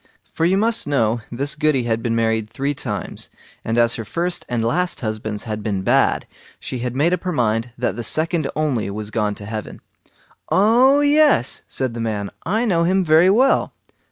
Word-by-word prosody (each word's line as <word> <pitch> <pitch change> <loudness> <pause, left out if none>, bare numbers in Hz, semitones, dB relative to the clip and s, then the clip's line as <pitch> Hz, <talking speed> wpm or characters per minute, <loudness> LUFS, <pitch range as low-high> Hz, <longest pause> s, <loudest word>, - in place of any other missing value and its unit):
For 165 - 0
you 185 +3 +3
must 220 -4 +1
know 120 -5 +1
this 140 +5 -1
Goody 150 -4 +1
had 115 -1 -1
been 115 0 -1
married 110 -1 0
three 135 +5 -2
times, - - -5 0.3
and 115 +1 -2
as 115 0 +4
her 115 - -4
first 175 +10 -2
and 120 -2 -1
last 175 +9 -1
husbands 110 -2 -4
had 110 -1 -4
been 100 -3 -2
bad, - - +2 0.3
she 130 - -5
had 125 0 -4
made 160 +6 +2
up 180 - -1
her 185 - -3
mind 115 -4 0
that 125 - -1
the 120 - -5
second 155 +3 0
only 140 -10 -1
was 105 +1 -6
gone 105 -2 -1
to 100 - -10
heaven. 110 0 -6 0.7
"Oh 245 +8 +4
yes", 290 - +3
said 130 -3 -3
the 115 - -5
man; 105 -3 -3
"I 220 +7 0
know 170 -7 +2
him 185 +2 +2
very 160 +3 +5
well." 250 +7 +3
125 Hz, 190 wpm, -20 LUFS, 110-175 Hz, 0.7 s, very